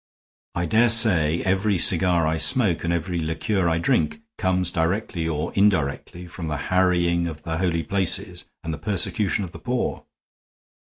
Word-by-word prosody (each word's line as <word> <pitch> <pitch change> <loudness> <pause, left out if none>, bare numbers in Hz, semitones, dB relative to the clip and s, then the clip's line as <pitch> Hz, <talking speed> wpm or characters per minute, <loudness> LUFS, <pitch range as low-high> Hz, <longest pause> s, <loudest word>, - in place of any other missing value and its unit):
I 85 - -1
dare 115 +7 +3
say 90 -9 +4
every 95 +1 +1
cigar 85 -1 +2
I 80 +1 0
smoke 85 +3 +2
and 85 - -1
every 85 +1 -2
liqueur 85 +4 -1
I 80 - +1
drink 140 - 0 0.2
comes 90 -1 0
directly 85 0 -1
or 75 -2 -3
indirectly 90 -3 0
from 85 -1 -7
the 75 -1 -2 0.2
harrying 85 -2 +2
of 80 -2 -8
the 80 0 -3
holy 85 -3 0
places 95 +2 -2 0.2
and 80 - -4
the - - -7
persecution 105 0 -1
of 90 - -7
the - - -11
poor. 125 0 -3
85 Hz, 160 wpm, -23 LUFS, 80-100 Hz, 0.2 s, say